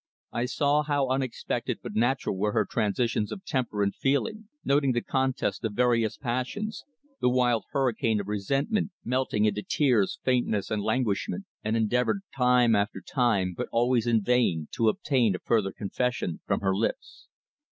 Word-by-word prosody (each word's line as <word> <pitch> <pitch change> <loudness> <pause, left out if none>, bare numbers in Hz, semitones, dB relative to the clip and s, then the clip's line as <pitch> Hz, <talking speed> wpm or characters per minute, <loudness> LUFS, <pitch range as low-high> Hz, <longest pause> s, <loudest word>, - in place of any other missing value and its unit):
I 120 - -1
saw 145 +3 +2
how 145 -3 0
unexpected 130 -2 -2
but - - -6
natural 120 0 +1
were 105 +2 0
her - - +2
transitions 110 -1 0
of 190 - -7
temper 120 -7 -1
and 100 - 0
feeling, 205 +11 -1 0.2
noted 140 -2 +2
the 120 - 0
contest 130 -2 -1
of 110 -2 -2
various 115 -1 +2
passions, 135 - -3 0.4
the - - +3
wild 125 -2 +2
hurricane 115 -5 +1
of 100 - -5
resentment 135 - 0 0.2
melting 125 -4 +1
into 105 -1 0
tears, 120 -6 +1
faintness 120 -6 0
and 105 -1 0
languishment, 125 - -1 0.2
and 110 +1 0
endeavoured 125 - +1
time 125 -3 +4
after 100 +1 0
time, 105 -8 0
but - - -4
always 120 0 +2
in 115 -3 +3
vain, 100 -10 +1
to 115 -1 +2
obtain 120 -5 +1
a - - -5
further 105 -4 +2
confession 115 -3 -2
from - - 0
her 95 -1 +1
lips. 110 +3 -3
120 Hz, 160 wpm, -27 LUFS, 105-130 Hz, 0.4 s, time